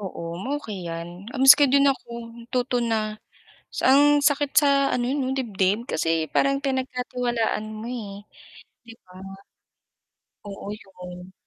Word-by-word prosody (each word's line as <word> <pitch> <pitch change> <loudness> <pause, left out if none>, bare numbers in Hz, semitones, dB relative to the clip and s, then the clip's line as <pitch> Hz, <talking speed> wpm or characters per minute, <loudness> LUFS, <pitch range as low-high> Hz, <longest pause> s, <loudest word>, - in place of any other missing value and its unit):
Oo, 190 -4 -7 0.4
okey 200 -10 -7
'yan. 165 +1 -5 0.3
Miski 280 +2 +9
din 280 +1 +4
ako - - -15 0.3
natuto 245 +1 -2
na 215 -2 -2 0.6
sa - - -3
ang 280 +2 +6 0.2
sakit 285 -1 +2
sa 290 -1 +5 0.3
ano 245 - 0
eh - - 0
'no, 265 0 -1
dibdib, 210 -4 0
kasi 160 -1 -1
parang 275 0 +2
pinagkatiwalaan 250 -4 -2
mo 215 +2 -7
eh 205 -5 -7 0.6
'di 230 -1 -13
ba. 180 - -18 1.4
Oo 200 0 -9
'yon. 180 -3 -11
230 Hz, 130 wpm, -24 LUFS, 195-265 Hz, 1.4 s, Miski